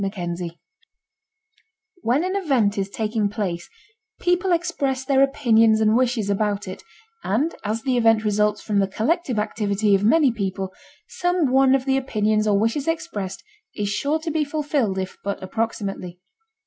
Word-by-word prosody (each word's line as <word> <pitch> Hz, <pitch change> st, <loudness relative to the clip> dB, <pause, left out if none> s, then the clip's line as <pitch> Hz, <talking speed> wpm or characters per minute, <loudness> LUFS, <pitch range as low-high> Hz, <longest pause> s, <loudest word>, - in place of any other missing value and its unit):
CHAPTER 185 Hz, -3 st, -3 dB
VII 170 Hz, -1 st, -7 dB, 1.4 s
When 260 Hz, +5 st, +1 dB
an 375 Hz, +2 st, -2 dB
event 265 Hz, -, +1 dB
is 195 Hz, 0 st, -2 dB
taking 215 Hz, 0 st, -1 dB
place 180 Hz, -5 st, -4 dB, 0.5 s
people 355 Hz, +1 st, +1 dB
express 285 Hz, -7 st, -1 dB
their 270 Hz, 0 st, +3 dB
opinions 230 Hz, -6 st, +4 dB
and 220 Hz, 0 st, +3 dB
wishes 240 Hz, -4 st, +1 dB
about 205 Hz, 0 st, -1 dB
it, 185 Hz, -, -7 dB, 0.4 s
and 275 Hz, -, 0 dB
as 220 Hz, +2 st, -2 dB
the 260 Hz, -2 st, +1 dB
event 225 Hz, -2 st, +4 dB
results 210 Hz, 0 st, +1 dB
from 205 Hz, -2 st, 0 dB
the 195 Hz, -, +2 dB
collective 250 Hz, -, -1 dB
activity 210 Hz, -1 st, 0 dB
of 195 Hz, 0 st, +3 dB
many 280 Hz, +4 st, +4 dB
people, 195 Hz, -3 st, -3 dB, 0.3 s
some 355 Hz, -6 st, 0 dB
one 265 Hz, 0 st, +5 dB
of 265 Hz, -1 st, -1 dB
the 270 Hz, -1 st, +2 dB
opinions 215 Hz, -5 st, 0 dB
or 205 Hz, -1 st, +3 dB
wishes 230 Hz, +8 st, 0 dB
expressed 265 Hz, -, -3 dB, 0.3 s
is 205 Hz, -2 st, -2 dB
sure 280 Hz, +10 st, 0 dB
to 325 Hz, 0 st, -3 dB
be 310 Hz, 0 st, +1 dB
fulfilled 285 Hz, -8 st, -1 dB
if 190 Hz, 0 st, -4 dB
but 200 Hz, 0 st, -2 dB
approximately. 195 Hz, -4 st, -4 dB
220 Hz, 160 wpm, -23 LUFS, 200-275 Hz, 1.4 s, one